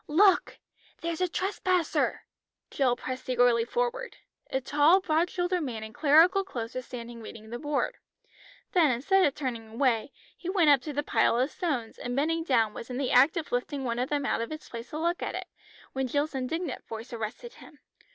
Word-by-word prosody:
"Look! 370 +5 +4 0.4
there's 335 +1 -3
a 365 - +3
trespasser." 370 -2 0 0.5
Jill 255 -3 +2
pressed 255 +1 -6
eagerly 245 -2 +4
forward. 485 - -2 0.3
A 265 - 0
tall 295 +7 +4
broad 345 -1 +1
shouldered 355 0 -1
man 235 -7 -4
in 220 0 -8
clerical 320 +8 +5
clothes 240 -11 -6
was 255 -1 -5
standing 235 -1 -8
reading 220 0 -10
the 240 - -4
board. 295 -1 -1 0.7
Then 335 -5 +4
instead 330 +11 +3
of 275 - -3
turning 240 -6 -4
away, 230 +2 0 0.2
he 360 - -6
went 350 -6 +4
up 275 -3 +5
to 300 - -5
the 290 +1 -1
pile 235 - +2
of 260 +4 +1
stones, 270 - -3
and 245 0 -4
bending 325 +4 +1
down 230 -8 +2
was 230 - -8
in 250 - -4
the 270 -1 -1
act 270 +7 +5
of 320 - -4
lifting 270 +3 -2
one 235 -1 -2
of 255 - -1
them 290 -1 0
out 230 - 0
of 230 - -4
its 310 0 -8
place 230 0 -7
to 300 - -5
look 340 +2 0
at - - -3
it, - - -4 0.5
when 265 0 -1
Jill's 290 +4 -1
indignant 275 +4 -3
voice 225 +2 -7
arrested 235 - -5
him. 295 - -15
280 Hz, 200 wpm, -28 LUFS, 245-335 Hz, 0.7 s, clerical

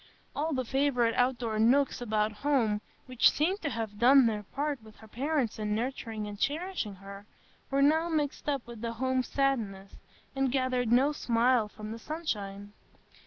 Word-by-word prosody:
All 310 +3 -1
the 260 -3 -1
favourite 250 -3 +1
outdoor 245 -3 0
nooks 255 +4 +3
about 215 -2 0
home, 220 -3 0 0.2
which 255 -2 +4
seemed 365 +7 0
to 290 - -1
have 220 -4 -5
done 265 +2 +7
their 215 -2 0
part 280 +5 -3
with 220 -1 -15
her 220 - -15
parents 265 0 -1
in 210 -1 -1
nurturing 225 -2 -3
and 205 -1 -7
cherishing 305 - -2
her, 200 +2 -11 0.4
were 275 0 +2
now 320 +4 +3
mixed 300 -2 -1
up 275 -4 -1
with 235 -2 -10
the 230 -1 -3
home 260 +2 0
sadness, 225 -8 -1 0.4
and 270 -1 +1
gathered 255 -3 0
no 265 +5 +4
smile 240 -4 +2
from 215 0 -9
the 225 - -6
sunshine. 205 -10 -5
245 Hz, 165 wpm, -30 LUFS, 215-275 Hz, 0.4 s, done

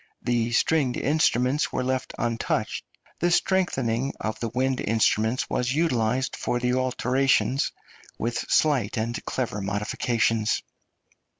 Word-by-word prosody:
The 120 -1 0
stringed 130 0 +2
instruments 140 -1 +2
were - - -1
left 130 0 -2
untouched; 115 -1 -1 0.4
the 175 - +2
strengthening 135 -10 +1
of 110 0 -3
the 115 - -2
wind 130 +2 0
instruments 110 +2 +1
was 125 +2 -1
utilised 130 -5 +1
for 120 - -1
the 125 0 0
alternations, 130 +1 +1 0.5
with 115 0 -2
slight 135 -10 +2
and 115 +2 -2
clever 120 -5 -2
modifications. 105 +2 0
125 Hz, 115 wpm, -25 LUFS, 115-135 Hz, 0.5 s, stringed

